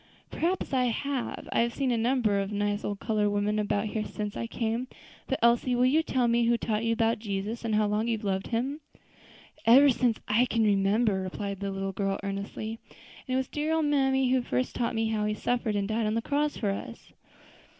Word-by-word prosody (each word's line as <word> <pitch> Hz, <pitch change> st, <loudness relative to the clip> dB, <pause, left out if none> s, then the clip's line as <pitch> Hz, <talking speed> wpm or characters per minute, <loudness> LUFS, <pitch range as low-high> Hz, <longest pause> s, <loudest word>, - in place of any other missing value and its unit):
"Perhaps 355 Hz, -3 st, -1 dB
I 255 Hz, -1 st, +3 dB, 0.2 s
may. 280 Hz, -3 st, -3 dB
I -, -, +1 dB
have 235 Hz, 0 st, -1 dB
seen 270 Hz, -3 st, 0 dB
a -, -, +2 dB
number 230 Hz, -3 st, +2 dB
of 195 Hz, +1 st, -3 dB
nice 205 Hz, 0 st, -1 dB
old 205 Hz, -1 st, -3 dB
colored 215 Hz, -2 st, +1 dB
women 205 Hz, +1 st, 0 dB
about 205 Hz, 0 st, 0 dB
here 215 Hz, 0 st, -2 dB
since 210 Hz, -1 st, -5 dB
I 230 Hz, -, -3 dB
came. 230 Hz, +2 st, -2 dB, 0.4 s
But, 270 Hz, -, 0 dB
Elsie, 240 Hz, +1 st, +3 dB
will 245 Hz, +1 st, +3 dB
you 290 Hz, +5 st, +4 dB
tell 255 Hz, -6 st, 0 dB
me 235 Hz, 0 st, +3 dB
who 235 Hz, 0 st, +3 dB
taught 220 Hz, -1 st, -1 dB
you 230 Hz, -, +1 dB
about 225 Hz, 0 st, +1 dB
Jesus, 210 Hz, +2 st, -4 dB
and 225 Hz, -2 st, 0 dB
how 215 Hz, 0 st, +3 dB
long 210 Hz, +2 st, 0 dB
you 230 Hz, -1 st, +1 dB
have 215 Hz, -, -12 dB
loved 190 Hz, -1 st, -1 dB
Him?" 255 Hz, +6 st, -2 dB, 0.9 s
"Ever 270 Hz, +4 st, +8 dB
since 240 Hz, -2 st, +1 dB
I 225 Hz, +4 st, +3 dB
can 230 Hz, -2 st, +1 dB
remember," 200 Hz, 0 st, +2 dB
replied 195 Hz, +1 st, -4 dB
the 200 Hz, 0 st, -3 dB
little 195 Hz, 0 st, -3 dB
girl 195 Hz, 0 st, -1 dB
earnestly; 200 Hz, +3 st, -4 dB, 0.5 s
"and 255 Hz, -, -1 dB
it -, -, +3 dB
was 260 Hz, -1 st, -1 dB
dear 305 Hz, +2 st, -1 dB
old 320 Hz, -1 st, +1 dB
mammy 265 Hz, -3 st, +2 dB
who 260 Hz, -1 st, +3 dB
first 255 Hz, +1 st, -2 dB
told 235 Hz, -1 st, -1 dB
me 225 Hz, 0 st, 0 dB
how 215 Hz, -1 st, 0 dB
He 210 Hz, 0 st, -1 dB
suffered 235 Hz, -1 st, -1 dB
and 200 Hz, -1 st, 0 dB
died 220 Hz, +1 st, 0 dB
on 215 Hz, -, 0 dB
the 230 Hz, -, 0 dB
cross 290 Hz, +1 st, 0 dB
for 205 Hz, -3 st, 0 dB
us." 230 Hz, +4 st, -8 dB
225 Hz, 225 wpm, -28 LUFS, 205-250 Hz, 0.9 s, Ever